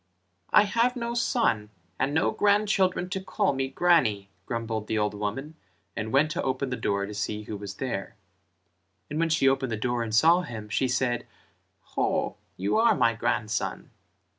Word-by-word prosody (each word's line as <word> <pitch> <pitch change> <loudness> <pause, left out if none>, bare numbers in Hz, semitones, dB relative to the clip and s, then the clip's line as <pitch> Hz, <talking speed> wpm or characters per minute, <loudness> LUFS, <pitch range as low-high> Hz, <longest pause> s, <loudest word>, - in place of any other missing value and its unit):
"I 210 - +6
have 235 +4 +1
no 235 -1 -3
son, 230 - +1 0.3
and 135 - +1
no 160 +3 +2
grandchildren 200 -3 +2
to 190 -2 -2
call 200 -2 0
me 135 0 -1
grannie," 135 - +2 0.2
grumbled 115 -2 -3
the 110 - -1
old 105 0 0
woman 105 +9 -4 0.4
and 110 0 -3
went 150 +4 +3
to - - -2
open 130 0 -2
the - - 0
door 100 -4 -1
to 105 - -7
see 105 +1 -3
who 105 - -6
was 100 -1 -7
there, 115 -4 -4 1.0
and 150 - -2
when 165 0 +2
she 155 -4 +3
opened 135 -2 +1
the 110 - -1
door 120 +2 -1
and 115 - -3
saw 165 +9 +6
him, 110 -9 -7
she 130 +5 +1
said 125 -1 0 0.7
"Ho, - - 0 0.2
you 100 - 0
are 230 +1 +5
my 120 -4 +3
grandson." 115 -1 -2
130 Hz, 175 wpm, -27 LUFS, 110-170 Hz, 1.0 s, I